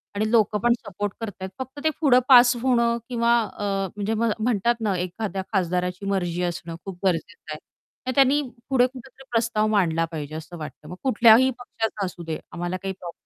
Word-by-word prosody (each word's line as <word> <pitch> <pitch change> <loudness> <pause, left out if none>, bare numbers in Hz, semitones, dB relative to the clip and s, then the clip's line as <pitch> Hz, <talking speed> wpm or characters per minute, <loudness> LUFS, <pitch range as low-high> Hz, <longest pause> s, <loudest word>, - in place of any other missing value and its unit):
आणि 215 +1 0
लोकं 215 -2 +3
पण 240 0 +5
सपोर्ट 205 -1 -5
करत 220 -2 -3
आहेत. 190 - -4
फक्त 260 +2 -7
ते 315 - +4
पुढं 265 -5 +6
पास 245 -1 +8
होणं 235 -2 +2
किंवा 235 -1 +1 0.3
अ, - - -5 0.3
म्हणजे 205 +1 -2
म्ह 225 0 +1
म्हणतात 235 0 +1
ना, 205 -3 0
एखाद्या 190 +2 -3
खासदाराची 180 +1 -1
मर्जी 175 -3 -1
असणं 170 -1 -4
खूप 195 -2 -7
गरजेचं 170 -2 -2
आहे. 155 - -7 0.5
तर - - +1
त्यांनी 275 +2 +4 0.3
पुढे 255 -2 +4
कुठेतरी 260 +1 -13
प्रस्ताव 225 -2 +1
मांडला 170 -6 +2
पाहिजे 155 -1 -6
असं 160 +2 -8
वाटतं. 155 -1 -9
मग 180 - -7
कुठल्याही 240 +1 +6
पक्षाचा 225 -4 -3
असू 175 -1 -7
दे, 160 -1 -4
आम्हाला 175 +1 -3
काही 195 0 -2
प्रॉब 175 -1 -7
205 Hz, 185 wpm, -24 LUFS, 180-235 Hz, 0.5 s, पास